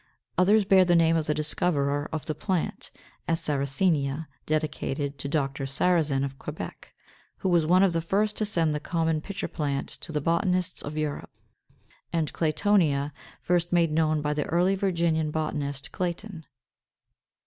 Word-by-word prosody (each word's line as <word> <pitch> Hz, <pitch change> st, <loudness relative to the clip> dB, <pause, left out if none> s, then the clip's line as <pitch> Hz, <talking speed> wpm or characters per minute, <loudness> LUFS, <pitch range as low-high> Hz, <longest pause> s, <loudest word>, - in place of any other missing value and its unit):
Others 205 Hz, +3 st, +4 dB
bear 190 Hz, -1 st, +6 dB
the 175 Hz, -1 st, +3 dB
name 165 Hz, -1 st, +4 dB
of 160 Hz, -2 st, 0 dB
the 150 Hz, -, +2 dB
discoverer 145 Hz, -2 st, 0 dB
of 155 Hz, -2 st, -4 dB
the 155 Hz, -, -2 dB
plant; 180 Hz, +2 st, -2 dB, 0.4 s
as, 165 Hz, -1 st, +1 dB
Sarracenia, 140 Hz, +1 st, 0 dB, 0.2 s
dedicated 145 Hz, -2 st, -2 dB
to 140 Hz, -, -3 dB
Dr. 140 Hz, -2 st, -1 dB
Sarrazin, 145 Hz, -2 st, +2 dB
of 135 Hz, -1 st, -7 dB
Quebec, -, -, -7 dB, 0.5 s
who 190 Hz, -, -1 dB
was 170 Hz, -3 st, +3 dB
one 180 Hz, +3 st, +5 dB
of 190 Hz, -3 st, +3 dB
the 165 Hz, -, +1 dB
first 205 Hz, +5 st, 0 dB
to -, -, 0 dB
send 165 Hz, -7 st, +2 dB
the 150 Hz, -, -1 dB
common 160 Hz, 0 st, 0 dB
Pitcher 195 Hz, +3 st, -4 dB
plant 140 Hz, -3 st, -2 dB
to -, -, -7 dB
the 150 Hz, -, 0 dB
botanists 180 Hz, +3 st, 0 dB
of 150 Hz, +2 st, -6 dB
Europe; 150 Hz, -2 st, -3 dB, 0.8 s
and 160 Hz, -3 st, -1 dB
Claytonia, 155 Hz, -4 st, +2 dB, 0.3 s
first 175 Hz, -1 st, +1 dB
made 170 Hz, -3 st, +3 dB
known 155 Hz, -1 st, +1 dB
by 150 Hz, 0 st, 0 dB
the 150 Hz, -1 st, -1 dB
early 175 Hz, +3 st, +2 dB
Virginian 170 Hz, -5 st, +1 dB
botanist 145 Hz, -3 st, -3 dB
Clayton. 175 Hz, -1 st, -4 dB
160 Hz, 160 wpm, -27 LUFS, 145-180 Hz, 0.8 s, bear